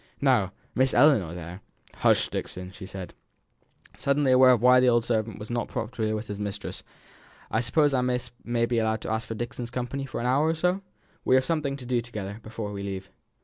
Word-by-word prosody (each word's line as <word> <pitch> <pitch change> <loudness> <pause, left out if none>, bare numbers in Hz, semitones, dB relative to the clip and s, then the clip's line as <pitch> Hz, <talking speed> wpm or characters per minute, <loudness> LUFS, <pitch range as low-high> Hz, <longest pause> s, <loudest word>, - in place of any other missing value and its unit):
Now, - - +3 0.2
Miss 130 +1 +2
Ellinor, 110 - +4
there 90 +2 -8 0.2
" - - -26
"Hush, - - +4
Dixon," 90 0 -5
she 95 0 -10
said, 95 -2 -7 0.8
suddenly 140 -1 +2
aware 130 0 +7
of 125 -2 +5
why 125 0 +7
the 125 0 +5
old 120 -1 +3
servant 110 -3 -1
was 105 +2 -8
not 120 0 -1
popular 110 -1 -2
with 110 +1 -5
his 105 0 -5
mistress. 100 0 -5 0.7
"I 110 - +2
suppose 140 +5 +2
I 130 - +2 0.4
may 120 0 +1
be 115 0 0
allowed 110 -1 0
to - - -4
ask 110 0 -1
for 115 - -4
Dixon's 120 +1 -5
company 130 +2 -4
for 120 - -5
an 120 - -3
hour 135 +5 +3
or 160 - +1
so; 180 +4 +1 0.4
we 130 - +4
have 130 0 +3
something 150 -4 -1
to 130 - -9
do 120 -1 +1
together 105 -3 -6
before 110 -1 -6
we 100 -1 -5
leave." 95 -1 -5
120 Hz, 210 wpm, -27 LUFS, 105-130 Hz, 0.8 s, aware